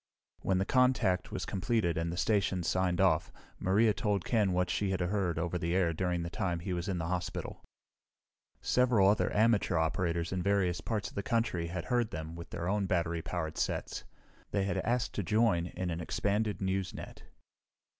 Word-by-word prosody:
When 95 Hz, -, +1 dB
the 95 Hz, -, +1 dB
contact 125 Hz, -7 st, +2 dB
was -, -, -3 dB
completed 95 Hz, -2 st, 0 dB
and 85 Hz, +1 st, -1 dB
the 85 Hz, -, -5 dB
stations 95 Hz, -3 st, +1 dB
signed 90 Hz, -1 st, +1 dB
off, 90 Hz, -4 st, +3 dB, 0.3 s
Maria 105 Hz, +4 st, +3 dB
told 105 Hz, -4 st, -1 dB
Ken 105 Hz, -5 st, +2 dB
what 90 Hz, 0 st, +1 dB
she 100 Hz, -, 0 dB
had 95 Hz, -1 st, 0 dB
heard 90 Hz, -2 st, 0 dB
over 85 Hz, +1 st, -1 dB
the 85 Hz, +2 st, -1 dB
air 90 Hz, -3 st, +2 dB
during 90 Hz, 0 st, -1 dB
the 85 Hz, -, -4 dB
time 90 Hz, -2 st, -1 dB
he 90 Hz, +1 st, -3 dB
was 85 Hz, -1 st, -3 dB
in 95 Hz, -2 st, -1 dB
the 80 Hz, -, -2 dB
hospital. 90 Hz, +1 st, -4 dB, 1.0 s
Several 120 Hz, -6 st, +4 dB
other 105 Hz, +2 st, +3 dB
amateur 110 Hz, -4 st, +3 dB
operators 85 Hz, +1 st, 0 dB
in 95 Hz, -1 st, -1 dB
various 95 Hz, -3 st, +1 dB
parts 105 Hz, 0 st, -2 dB
of -, -, -18 dB
the 100 Hz, -, -2 dB
country 100 Hz, -6 st, 0 dB
had 85 Hz, 0 st, -4 dB
heard 120 Hz, -3 st, +1 dB
them 80 Hz, +1 st, -6 dB
with 85 Hz, 0 st, -9 dB
their 85 Hz, +1 st, -4 dB
own 100 Hz, 0 st, +1 dB
battery 85 Hz, -2 st, 0 dB
powered 80 Hz, -2 st, -4 dB
sets. -, -, -2 dB, 0.5 s
They 100 Hz, -, 0 dB
had 100 Hz, -, -1 dB
asked 120 Hz, +1 st, 0 dB
to 100 Hz, -, -2 dB
join 100 Hz, -3 st, +2 dB
in 90 Hz, 0 st, -4 dB
an 85 Hz, +1 st, -3 dB
expanded 105 Hz, +4 st, -1 dB
news 95 Hz, 0 st, -1 dB
net. -, -, -9 dB
95 Hz, 190 wpm, -31 LUFS, 85-105 Hz, 1.0 s, Several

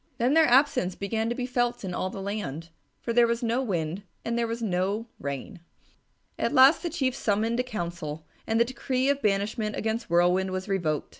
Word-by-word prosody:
Then 245 Hz, +4 st, +2 dB
their 320 Hz, 0 st, +6 dB
absence 245 Hz, -8 st, +3 dB
began 220 Hz, +3 st, -2 dB
to 240 Hz, -, -1 dB
be 250 Hz, -, -2 dB
felt 245 Hz, -2 st, -1 dB
in 180 Hz, -, -4 dB
all 185 Hz, -, -2 dB
the 195 Hz, +1 st, -7 dB
land, 170 Hz, -6 st, -4 dB, 0.3 s
for 235 Hz, -, -1 dB
there 240 Hz, 0 st, +5 dB
was 235 Hz, +1 st, -1 dB
no 235 Hz, +2 st, +1 dB
wind 175 Hz, -6 st, -2 dB, 0.2 s
and 235 Hz, -, -1 dB
there 235 Hz, 0 st, 0 dB
was 230 Hz, +1 st, -3 dB
no 195 Hz, +2 st, -1 dB
rain. 140 Hz, -, -5 dB, 0.8 s
At -, -, 0 dB
last 265 Hz, +4 st, +7 dB
the 345 Hz, -, -2 dB
Chief 270 Hz, -6 st, 0 dB
summoned 225 Hz, 0 st, 0 dB
a -, -, +2 dB
council, 170 Hz, -9 st, -5 dB, 0.2 s
and 225 Hz, 0 st, +1 dB
the 235 Hz, -, +5 dB
decree 260 Hz, +1 st, -1 dB
of 280 Hz, 0 st, +1 dB
banishment 210 Hz, +1 st, 0 dB
against 225 Hz, 0 st, -2 dB
Whirlwind 180 Hz, +2 st, +3 dB
was 185 Hz, +1 st, -4 dB
revoked. 170 Hz, -7 st, -1 dB
220 Hz, 200 wpm, -27 LUFS, 185-240 Hz, 0.8 s, last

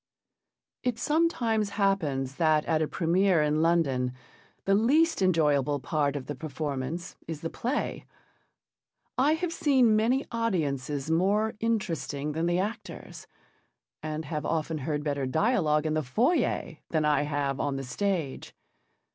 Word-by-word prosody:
It 250 Hz, -3 st, -1 dB
sometimes 240 Hz, -10 st, +1 dB
happens 145 Hz, -10 st, 0 dB
that 155 Hz, -2 st, +3 dB
at 160 Hz, -1 st, +1 dB
a 155 Hz, -, +1 dB
première 175 Hz, -1 st, +2 dB
in 150 Hz, +1 st, +1 dB
London 140 Hz, -7 st, +2 dB, 0.5 s
the 195 Hz, -, +3 dB
least 280 Hz, +8 st, +3 dB
enjoyable 150 Hz, -6 st, +2 dB
part 145 Hz, +1 st, 0 dB
of 135 Hz, -3 st, -4 dB
the 145 Hz, -, -4 dB
performance 150 Hz, +2 st, -4 dB
is 160 Hz, -2 st, -5 dB
the 165 Hz, -, -4 dB
play. 255 Hz, +5 st, -3 dB, 1.1 s
I 280 Hz, +4 st, +3 dB
have 330 Hz, +1 st, -2 dB
seen 260 Hz, -9 st, +4 dB
many 240 Hz, +6 st, +2 dB
audiences 150 Hz, -, -1 dB
more 205 Hz, +6 st, +2 dB
interesting 170 Hz, -10 st, -1 dB
than 160 Hz, +3 st, -1 dB
the 175 Hz, 0 st, +1 dB
actors, 205 Hz, +5 st, -5 dB, 0.7 s
and 155 Hz, 0 st, -4 dB
have 150 Hz, 0 st, -3 dB
often 160 Hz, -1 st, -1 dB
heard 150 Hz, +1 st, -2 dB
better 140 Hz, -3 st, -1 dB
dialogue 160 Hz, -, +2 dB
in 155 Hz, -, 0 dB
the 155 Hz, -, +1 dB
foyer 225 Hz, -, 0 dB
than 155 Hz, -2 st, +1 dB
I 150 Hz, -1 st, +3 dB
have 145 Hz, -2 st, -1 dB
on 145 Hz, -1 st, -1 dB
the 135 Hz, -, -4 dB
stage. 160 Hz, +1 st, -3 dB
160 Hz, 140 wpm, -28 LUFS, 145-215 Hz, 1.1 s, seen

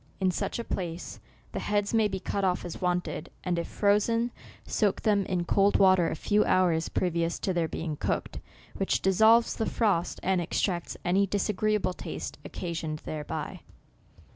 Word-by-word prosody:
In 190 Hz, -2 st, +2 dB
such -, -, -2 dB
a 235 Hz, -, -3 dB
place, 175 Hz, -5 st, -5 dB, 0.3 s
the -, -, -3 dB
heads 205 Hz, 0 st, 0 dB
may 220 Hz, -2 st, +4 dB
be 190 Hz, -2 st, -4 dB
cut 200 Hz, +1 st, -2 dB
off 180 Hz, -2 st, +1 dB
as 175 Hz, -, -7 dB
wanted, 180 Hz, -1 st, -1 dB
and 175 Hz, -2 st, 0 dB
if 170 Hz, -, -3 dB
frozen, 230 Hz, +4 st, +2 dB, 0.3 s
soak 205 Hz, -3 st, +1 dB
them 205 Hz, -3 st, +2 dB
in 180 Hz, -2 st, -1 dB
cold 200 Hz, +3 st, +3 dB
water 185 Hz, -3 st, +5 dB
a -, -, -3 dB
few 210 Hz, +6 st, +2 dB
hours 170 Hz, -3 st, +2 dB
previous 170 Hz, -1 st, 0 dB
to 190 Hz, -, -1 dB
their 170 Hz, -2 st, +1 dB
being 160 Hz, -2 st, -4 dB
cooked, -, -, -2 dB, 0.4 s
which 195 Hz, -, 0 dB
dissolves 220 Hz, +5 st, +5 dB
the 225 Hz, -, -1 dB
frost, 200 Hz, -7 st, 0 dB
and 185 Hz, -1 st, +2 dB
extracts 175 Hz, +1 st, -1 dB
any 195 Hz, +3 st, +3 dB
disagreeable 205 Hz, -1 st, 0 dB
taste -, -, -6 dB
occasioned 165 Hz, -3 st, -4 dB
thereby." 150 Hz, -1 st, -5 dB
185 Hz, 165 wpm, -28 LUFS, 175-205 Hz, 0.4 s, water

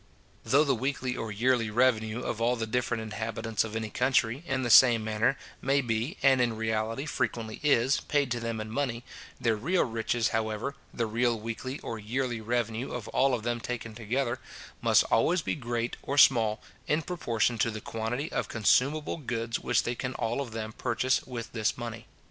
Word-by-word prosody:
Though 140 Hz, +3 st, +4 dB
the 140 Hz, -3 st, +2 dB
weekly 130 Hz, 0 st, -2 dB
or 115 Hz, -1 st, -4 dB
yearly 115 Hz, +1 st, +1 dB
revenue 110 Hz, -1 st, +2 dB
of 115 Hz, -1 st, -3 dB
all 120 Hz, +2 st, +3 dB
the 115 Hz, -2 st, -2 dB
different 115 Hz, 0 st, -1 dB
inhabitants 110 Hz, 0 st, -2 dB
of 110 Hz, 0 st, -6 dB
any 110 Hz, -1 st, -3 dB
country, 125 Hz, 0 st, +1 dB
in 130 Hz, -1 st, 0 dB
the 120 Hz, -, 0 dB
same 120 Hz, -3 st, +8 dB
manner, 110 Hz, +5 st, +1 dB, 0.2 s
may 135 Hz, +2 st, +2 dB
be, 120 Hz, -, -1 dB
and 135 Hz, -2 st, +5 dB
in 120 Hz, -2 st, +1 dB
reality 110 Hz, +4 st, -1 dB
frequently 115 Hz, -7 st, -2 dB
is, 140 Hz, -2 st, +3 dB
paid 145 Hz, -3 st, 0 dB
to 120 Hz, -, 0 dB
them 115 Hz, -1 st, -3 dB
in 110 Hz, 0 st, -5 dB
money, 120 Hz, -2 st, -2 dB, 0.4 s
their 115 Hz, -2 st, +2 dB
real 170 Hz, -, +1 dB
riches, 115 Hz, -1 st, 0 dB
however, 110 Hz, +4 st, -2 dB, 0.2 s
the 115 Hz, -, -1 dB
real 115 Hz, +1 st, +1 dB
weekly 115 Hz, +5 st, -5 dB
or 115 Hz, -, -5 dB
yearly 120 Hz, +2 st, -2 dB
revenue 115 Hz, +1 st, -2 dB
of 125 Hz, -4 st, -5 dB
all 135 Hz, 0 st, +3 dB
of 115 Hz, -, -6 dB
them 120 Hz, 0 st, -1 dB
taken 115 Hz, -1 st, -5 dB
together, 120 Hz, +3 st, -2 dB, 0.4 s
must -, -, +5 dB
always 165 Hz, +9 st, +3 dB
be -, -, -1 dB
great 120 Hz, -4 st, -3 dB
or 140 Hz, -, -3 dB
small, 115 Hz, -6 st, +5 dB, 0.3 s
in 155 Hz, +2 st, +1 dB
proportion 120 Hz, -9 st, 0 dB
to 115 Hz, -, +2 dB
the 110 Hz, -1 st, -5 dB
quantity 115 Hz, +8 st, -3 dB
of -, -, -1 dB
consumable 135 Hz, +9 st, +2 dB
goods 115 Hz, -5 st, -3 dB
which 120 Hz, -2 st, +1 dB
they 120 Hz, -, -1 dB
can 130 Hz, +1 st, -4 dB
all 115 Hz, +4 st, -1 dB
of 130 Hz, -5 st, -6 dB
them 110 Hz, -1 st, -5 dB
purchase 125 Hz, +2 st, 0 dB
with 120 Hz, -3 st, -6 dB
this 110 Hz, -2 st, 0 dB
money. 115 Hz, -2 st, -6 dB
120 Hz, 190 wpm, -29 LUFS, 110-130 Hz, 0.4 s, same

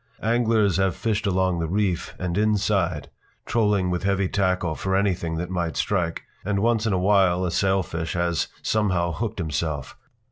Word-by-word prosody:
Anglers 110 Hz, -4 st, +2 dB
have 95 Hz, -2 st, +1 dB
fished 110 Hz, -2 st, -1 dB
along 95 Hz, -2 st, +1 dB
the 80 Hz, -, -1 dB
reef 95 Hz, -1 st, -1 dB
and 90 Hz, -2 st, -3 dB
inside, 100 Hz, -6 st, +1 dB, 0.3 s
trolling 105 Hz, -5 st, +1 dB
with 90 Hz, -, -1 dB
heavy 100 Hz, -1 st, +1 dB
tackle 90 Hz, -4 st, 0 dB
for 95 Hz, +4 st, -1 dB
anything 90 Hz, -4 st, 0 dB
that 90 Hz, +2 st, -4 dB
might 85 Hz, -3 st, -2 dB
strike, 90 Hz, -5 st, -1 dB, 0.2 s
and 100 Hz, +1 st, -1 dB
once 115 Hz, +1 st, +2 dB
in 105 Hz, -, +1 dB
a -, -, +2 dB
while 95 Hz, -1 st, +3 dB
a 90 Hz, -, -1 dB
sailfish 85 Hz, -3 st, 0 dB
has 85 Hz, -1 st, 0 dB, 0.2 s
somehow 90 Hz, -5 st, +1 dB
hooked 110 Hz, +6 st, -3 dB
himself. 75 Hz, -4 st, -3 dB
95 Hz, 165 wpm, -24 LUFS, 85-105 Hz, 0.3 s, while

